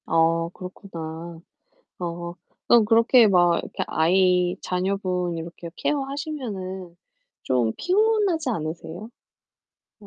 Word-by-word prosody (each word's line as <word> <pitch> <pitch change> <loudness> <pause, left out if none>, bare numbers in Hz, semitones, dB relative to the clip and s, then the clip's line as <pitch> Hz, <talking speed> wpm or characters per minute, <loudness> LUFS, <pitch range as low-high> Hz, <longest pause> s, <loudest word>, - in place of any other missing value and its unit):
어 165 +1 +2
그렇구나. 170 -3 -8 0.6
어 170 -1 -4 0.3
그럼 235 -2 +6
그렇게 230 +1 +6
막 175 -3 +4
이렇게 - - -4
아이 180 +2 +3
자녀분 180 -2 -1
이렇게 170 +1 -7
케어하시면은 255 - -4 0.5
좀 120 -4 +1
피곤하지 390 -5 +2
않으세요? 170 +1 -5 0.9
아 205 - -14
180 Hz, 235 characters per minute, -24 LUFS, 170-230 Hz, 0.9 s, 그럼